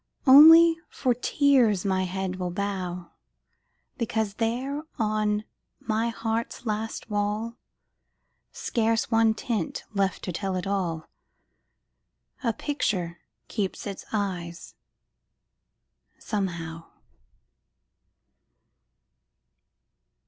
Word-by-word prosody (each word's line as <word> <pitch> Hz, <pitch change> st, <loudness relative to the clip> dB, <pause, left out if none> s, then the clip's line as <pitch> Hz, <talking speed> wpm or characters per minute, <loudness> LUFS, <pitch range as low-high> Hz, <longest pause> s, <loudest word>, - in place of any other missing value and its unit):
Only, 325 Hz, +4 st, +9 dB
for 255 Hz, -3 st, 0 dB
tears 245 Hz, -5 st, +2 dB
my 190 Hz, -1 st, +1 dB
head 185 Hz, 0 st, -3 dB
will 180 Hz, -1 st, -2 dB
bow, 180 Hz, -2 st, -4 dB, 0.9 s
Because 220 Hz, -3 st, -1 dB
there 245 Hz, +6 st, -2 dB, 0.2 s
on 215 Hz, -1 st, 0 dB, 0.4 s
my 225 Hz, +1 st, -1 dB
heart's 230 Hz, +1 st, -3 dB
last 220 Hz, 0 st, -3 dB
wall, 210 Hz, +3 st, -2 dB, 0.9 s
Scarce 225 Hz, 0 st, 0 dB
one 225 Hz, -1 st, +4 dB
tint 220 Hz, -8 st, -3 dB
left 195 Hz, -1 st, 0 dB
to 180 Hz, -, -3 dB
tell 190 Hz, +2 st, -3 dB
it 185 Hz, -, -3 dB
all, 180 Hz, -5 st, -2 dB, 1.4 s
A 230 Hz, -, +2 dB
picture 190 Hz, -, -2 dB, 0.3 s
keeps 195 Hz, -3 st, -3 dB
its 200 Hz, -2 st, -6 dB
eyes, 180 Hz, -5 st, -4 dB, 1.4 s
somehow. 170 Hz, -5 st, -4 dB
210 Hz, 85 wpm, -26 LUFS, 185-230 Hz, 1.4 s, Only